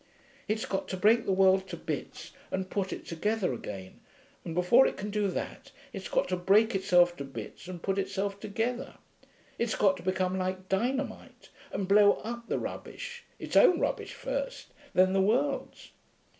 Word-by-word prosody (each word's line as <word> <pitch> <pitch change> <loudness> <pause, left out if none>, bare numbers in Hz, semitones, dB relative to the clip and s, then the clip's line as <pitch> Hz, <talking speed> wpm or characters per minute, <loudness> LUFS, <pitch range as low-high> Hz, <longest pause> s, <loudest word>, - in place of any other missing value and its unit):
It's 215 +1 -1
got 190 - -2
to 185 - -4
break 220 +4 +4
the - - +2
world 190 0 +4
to 175 -2 -6
bits 155 -3 -5 0.2
and 190 0 -3
put 195 -2 -1
it - - -6
together 190 0 -1
again, 95 -5 -8 0.4
and 165 - -5
before 180 +9 +5
it - - -4
can 205 +2 -4
do 210 -1 +1
that 190 - -5 0.2
it's - - -6
got - - +1
to - - +1
break 205 +5 +4
itself 180 -3 +4
to 140 - -4
bits 135 - -8
and 180 -2 -8
put 195 0 0
itself 195 +1 -2
together. 225 +5 -3 0.6
It's 235 -1 0
got 195 -2 +3
to - - -10
become 185 0 0
like 185 0 -3
dynamite, 250 +9 -2 0.2
and 195 - -2
blow 205 +1 +6
up 235 +1 -6
the - - 0
rubbish 480 -1 -6
its - - -6
own 350 -2 +7
rubbish - - -2
first, - - -4 0.2
then 185 +1 +5
the 195 - +3
world's....' 260 +8 0
195 Hz, 175 wpm, -29 LUFS, 185-225 Hz, 0.6 s, own